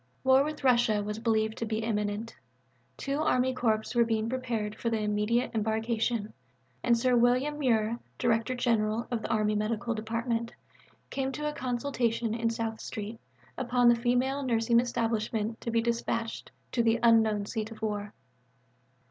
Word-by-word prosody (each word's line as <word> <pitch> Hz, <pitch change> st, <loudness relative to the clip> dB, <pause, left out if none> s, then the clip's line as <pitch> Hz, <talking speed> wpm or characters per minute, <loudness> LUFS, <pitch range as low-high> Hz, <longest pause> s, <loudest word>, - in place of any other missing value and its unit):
War 265 Hz, +1 st, +5 dB
with 305 Hz, 0 st, -5 dB
Russia 235 Hz, -5 st, +3 dB
was 210 Hz, +1 st, -4 dB
believed 220 Hz, -1 st, 0 dB
to 230 Hz, -, -1 dB
be 220 Hz, 0 st, -2 dB
imminent; 210 Hz, 0 st, -2 dB, 0.6 s
two 275 Hz, +1 st, -2 dB
Army 260 Hz, -4 st, +2 dB
Corps 220 Hz, -4 st, +1 dB
were 240 Hz, -1 st, +5 dB
being 225 Hz, -1 st, 0 dB
prepared 235 Hz, -5 st, -2 dB
for 235 Hz, -, -5 dB
immediate 215 Hz, +1 st, 0 dB
embarkation; 220 Hz, 0 st, -1 dB, 0.5 s
and 235 Hz, -1 st, +3 dB
Sir 250 Hz, +1 st, +2 dB
William 250 Hz, +5 st, +2 dB
Muir, 230 Hz, -4 st, +1 dB, 0.2 s
Director 235 Hz, +1 st, +1 dB
General 230 Hz, -2 st, +1 dB
of 235 Hz, -2 st, -1 dB
the -, -, -5 dB
Army 215 Hz, -2 st, +1 dB
Medical 225 Hz, +3 st, -1 dB
Department, 230 Hz, +1 st, -2 dB, 0.6 s
came 270 Hz, -1 st, -1 dB
to 300 Hz, +4 st, -3 dB
a 300 Hz, -, -2 dB
consultation 240 Hz, -4 st, -1 dB
in 230 Hz, 0 st, 0 dB
South 225 Hz, -1 st, -3 dB
Street 215 Hz, +2 st, -6 dB, 0.4 s
upon 245 Hz, 0 st, +3 dB
the 240 Hz, -, +6 dB
female 250 Hz, +4 st, +1 dB
nursing 235 Hz, -2 st, +2 dB
establishment 225 Hz, -2 st, -1 dB
to -, -, -4 dB
be 230 Hz, 0 st, +1 dB
dispatched 230 Hz, -1 st, -2 dB, 0.2 s
to 240 Hz, -, +1 dB
the 230 Hz, 0 st, +2 dB
(unknown) 220 Hz, -3 st, +4 dB
seat 220 Hz, 0 st, -3 dB
of 225 Hz, -1 st, -11 dB
war. 210 Hz, -1 st, -2 dB
230 Hz, 155 wpm, -29 LUFS, 220-245 Hz, 0.6 s, the